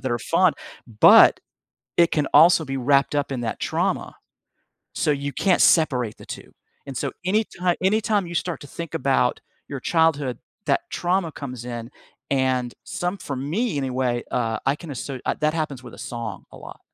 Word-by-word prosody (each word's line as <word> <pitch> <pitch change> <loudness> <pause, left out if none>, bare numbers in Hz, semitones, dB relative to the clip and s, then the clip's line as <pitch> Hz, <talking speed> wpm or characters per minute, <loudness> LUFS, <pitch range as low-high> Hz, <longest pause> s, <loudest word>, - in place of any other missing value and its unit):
that 130 - -3
are 120 - 0
fun, - - +3 0.5
but - - +8 0.6
it 170 0 +5
can 150 -3 +1
also 165 +2 +7
be 135 -1 -3
wrapped 140 +3 +2
up 145 -1 -1
in 130 -3 -3
that 115 -2 -3
trauma. - - -1 0.8
So - - +1
you 140 0 -2
can't 190 -3 +2
separate 125 -9 +3
the - - -13
2, - - -9 0.3
and 135 - -7
so - - -2
anyti 210 +4 0 0.3
anytime 205 -1 +1
you 170 - -7
start 170 -2 -2
to 145 - -10
think 170 +3 -7
about 130 -2 +1 0.3
your 140 - -5
childhood, 145 -5 +1 0.3
that - - +2
trauma 175 -1 0
comes 125 -5 -7
in, 120 0 -6 0.4
and 130 -2 +1
some 180 +3 -3
for 140 - -5
me 155 - -2
anyway, 130 -3 -1
uh, 115 -3 0
I 135 +2 +2
can 160 0 -9
asser 135 0 -5
uh, - - 0
that 155 0 +1
happens 150 -5 -3
with 125 - -11
a - - -18
song 115 -5 -6
a - - -12
lot. - - -11
140 Hz, 180 wpm, -23 LUFS, 125-165 Hz, 0.8 s, but